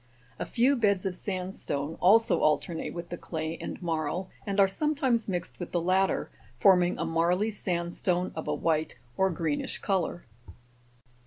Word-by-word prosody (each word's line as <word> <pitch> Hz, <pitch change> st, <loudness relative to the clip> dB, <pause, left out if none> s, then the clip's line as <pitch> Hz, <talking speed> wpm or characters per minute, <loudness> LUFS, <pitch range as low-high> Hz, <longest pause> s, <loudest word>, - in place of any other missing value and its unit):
A -, -, -3 dB
few 255 Hz, +4 st, +3 dB
beds 200 Hz, -6 st, +2 dB
of 190 Hz, -2 st, -1 dB
sand 185 Hz, 0 st, -4 dB
stone 145 Hz, +2 st, -3 dB
also 220 Hz, +5 st, +5 dB
alternate 160 Hz, +2 st, 0 dB
with 170 Hz, 0 st, -7 dB
the 175 Hz, -, -6 dB
clay 160 Hz, 0 st, -4 dB
and -, -, -5 dB
marl, 165 Hz, +2 st, -2 dB, 0.2 s
and 200 Hz, 0 st, -1 dB
are 195 Hz, -, +7 dB
sometimes 260 Hz, -1 st, 0 dB
mixed 180 Hz, -2 st, -4 dB
with 175 Hz, -, -6 dB
the 175 Hz, -, +2 dB
latter, 185 Hz, +3 st, +1 dB, 0.3 s
forming 180 Hz, +4 st, +5 dB
a 165 Hz, -, -1 dB
marly 175 Hz, +6 st, +1 dB
sandstone 180 Hz, -1 st, -1 dB
of 160 Hz, -, -5 dB
a -, -, 0 dB
white 160 Hz, -1 st, 0 dB, 0.2 s
or 190 Hz, 0 st, +3 dB
greenish 160 Hz, -4 st, -2 dB
colour. 180 Hz, -3 st, -1 dB
180 Hz, 160 wpm, -28 LUFS, 165-195 Hz, 0.3 s, are